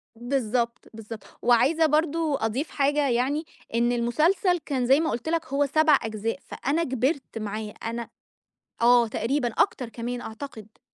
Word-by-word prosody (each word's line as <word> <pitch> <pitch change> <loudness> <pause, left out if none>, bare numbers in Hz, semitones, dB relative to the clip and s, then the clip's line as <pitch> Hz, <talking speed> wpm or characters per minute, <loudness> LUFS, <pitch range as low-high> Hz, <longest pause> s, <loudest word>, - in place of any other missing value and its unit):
بالضبط، 240 -1 -1
بالضبط. 225 0 -9 0.2
وعايزة 265 +7 +4
برضه 310 0 +1
أضيف 260 +8 -2
حاجة 285 0 +1
يعني، 270 +6 0 0.3
إن 240 +1 +2
المسلسل 315 - +2
كان 265 -5 -2
زي 270 +4 +5
ما 320 - 0
قُلت 240 +7 -3
لك 330 -1 0
هو 280 +1 +1
7 310 0 +4
أجزاء، 225 +3 -3
فأنا 300 +6 -1
كِبرت 260 -1 -1
معاه. 215 0 -4
أنا 230 +1 -4 0.7
آه 240 -1 +6
تقريبًا 245 +4 0
أكتر 250 +1 +1
كمان 240 +2 -5
أعتقد. 220 -2 -9
250 Hz, 145 wpm, -26 LUFS, 230-295 Hz, 0.7 s, آه